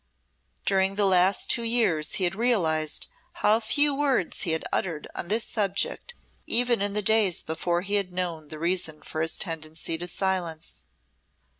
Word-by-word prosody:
During 195 0 +2
the 205 0 +2
last 190 0 +3
two 235 - +1
years 225 -10 +1
he 190 - 0
had 175 0 +1
realised 170 -9 0 0.3
how 215 +2 +3
few 290 +6 +2
words 275 - 0
he 180 - 0
had 160 - -1
uttered 165 -5 -2
on - - -4
this 220 +4 +1
subject 205 - -1 0.3
even 240 -2 +2
in 200 0 0
the 210 0 0
days 210 -3 +2
before 170 +2 -1
he 200 +2 -5
had 185 -2 -12
known 175 -4 -3
the 155 - -8
reason 170 -1 -1
for 155 - -4
his 160 0 0
tendency 160 -1 -4
to 175 - -4
silence. 175 -3 -2
185 Hz, 165 wpm, -26 LUFS, 165-215 Hz, 0.3 s, last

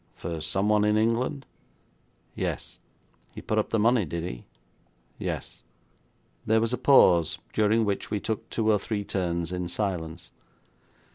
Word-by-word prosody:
'For 85 -2 -5
someone 105 +7 +2
in 105 0 +3
England?' 120 +5 0 0.9
'Yes.' - - -4 0.6
'He - - -7
put 110 - 0
up 105 - -1
the - - +1
money, 115 +1 +3
did 85 0 -4
he?' - - -7 0.7
'Yes.' - - -5 0.8
There 110 +1 +3
was 115 +2 0
a - - 0
pause, 90 - +5 0.2
during 110 +1 +3
which 100 -1 -2
we 105 - -1
took 110 +1 -4
two 110 -1 +1
or 105 - +3
three 100 0 -3
turns 85 -3 -2
in 90 -1 -3
silence. 85 -2 -3
105 Hz, 145 wpm, -27 LUFS, 85-110 Hz, 0.9 s, pause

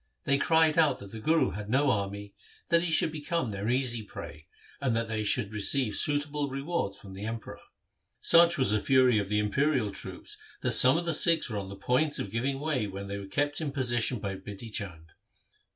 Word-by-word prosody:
They 140 0 +1
cried 160 0 +3
out 155 -3 +3
that 100 -1 -12
the 115 - -8
Guru 160 +8 +2
bad 105 0 -7
no 135 +3 +2
army, 100 -1 -4 0.4
that 170 0 +4
he 175 -1 -2
should 155 - +3
become 155 -4 -3
their 100 +2 -4
easy 125 -2 0
prey, 80 -6 -10 0.3
and 130 -4 0
that 115 0 -1
they 110 -1 -2
should 105 0 -1
receive 105 +2 +1
suitable 145 -1 0
rewards 140 -3 -3
from 95 -2 -12
the 100 +3 -6
Emperor. 115 0 -7 0.6
Such 170 0 +6
was 130 -6 +2
the 110 - +2
fury 130 -4 +4
of 100 -1 -4
the 105 - 0
imperial 120 +2 0
troops - - -6 0.2
that - - 0
some 130 +4 +7
of 170 - -3
the 170 - 0
Sikhs 165 -4 +3
were 105 - -2
on 95 -1 -7
the 100 - -8
point 130 +9 0
of 100 - -5
giving 135 +5 -2
way 140 -7 -1
when 100 0 -7
they 100 0 -4
were 100 - -9
kept 145 +8 -1
in 150 -3 -3
position 125 -2 0
by 100 -2 -5
Bidhi 105 +3 -9
Chand. 85 -7 -5
120 Hz, 210 wpm, -28 LUFS, 105-145 Hz, 0.6 s, some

